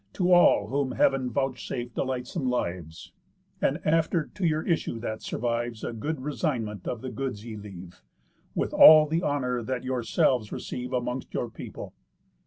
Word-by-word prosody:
To 180 0 +1
all 175 -1 +5
whom 135 -1 -1
heav'n 135 -1 +2
vouchsafe 125 -1 -3
delightsome 130 +2 -2
lives, 85 -9 -4 0.5
And 145 +5 +1
after 160 0 +1
to 190 - -2
your 155 0 0
issue 165 -8 -1
that 110 -1 -5
survives 120 -1 -3
A - - -3
good 145 +6 -4
resignment 125 - -3
of 120 - -3
the 130 - -5
goods 125 -6 -4
ye 115 -2 -6
leave, 95 -4 -10 0.5
With - - -1
all 155 0 +9
the 160 +3 -1
honour 125 -6 -1
that 125 +2 -3
yourselves 125 -2 +1
receive 125 0 -5
Amongst 125 0 -3
your 120 - -2
people. - - -9
125 Hz, 155 wpm, -27 LUFS, 115-145 Hz, 0.5 s, all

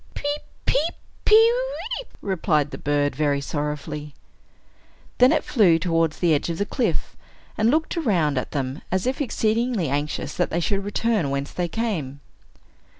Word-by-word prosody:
"Peep, 290 +1 -2 0.2
peep, 325 +4 +1 0.3
pe 430 - +7
weep!" - - +2
replied 155 -6 0
the - - -7
bird, 145 -1 0
very 145 -1 +1
sorrowfully. 150 0 -4 1.0
Then 250 +1 +7
it - - +2
flew 190 -10 +4
towards 165 -2 +1
the 170 -3 +3
edge 150 - 0
of 165 - -2
the 205 - 0
cliff, 245 +3 -1 0.4
and 220 +1 +2
looked 315 +6 +1
around 175 - +1
at - - -5
them, 135 0 -3
as 185 0 0
if 260 +3 -1
exceedingly 225 - 0
anxious 145 +2 -2
that - - 0
they 170 - -1
should 195 +3 0
return 205 -5 0
whence 140 0 -2
they 175 -1 -2
came. 170 - -3
175 Hz, 155 wpm, -24 LUFS, 150-235 Hz, 1.0 s, pe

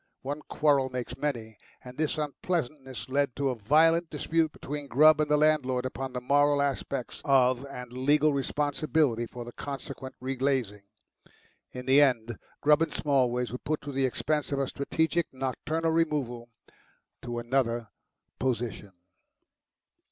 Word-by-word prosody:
One 145 +3 -4
quarrel 140 -3 +2
makes 125 -1 -5
many, 115 -7 -4 0.2
and 125 0 -10
this 155 +2 -1
unpleasantness 140 - -3
led 140 -1 0
to 140 -1 0
a 130 - -1
violent 160 +9 +3
dispute 160 +1 0
between 145 0 -6
Grubb 155 +4 +6
and 150 - 0
the 150 - +4
landlord 130 -5 +2
upon 130 +1 -4
the 125 - -3
moral 145 +3 +3
aspects 140 -2 -2
of 130 -1 +3
and 125 -3 -8
legal 145 +4 +3
responsibility 145 -3 0
for 120 0 -8
the 120 - -8
consequent 135 0 -7
re 130 +1 -3
glazing. 130 -6 -1 0.9
In 125 0 -7
the 135 +2 +6
end 120 -5 +1 0.2
Grubb 150 +1 +5
and 165 - +1
Smallways 125 -4 +1
were 125 - -5
put 155 0 -2
to 145 - -6
the 135 -1 +1
expense 150 +4 -1
of 140 - 0
a 135 - +1
strategic 160 +5 -1
nocturnal 150 +5 -2
removal 140 -8 -1 0.7
to 120 -1 -5
another 120 -2 0 0.5
position. 120 -5 -2
135 Hz, 145 wpm, -28 LUFS, 125-150 Hz, 0.9 s, Grubb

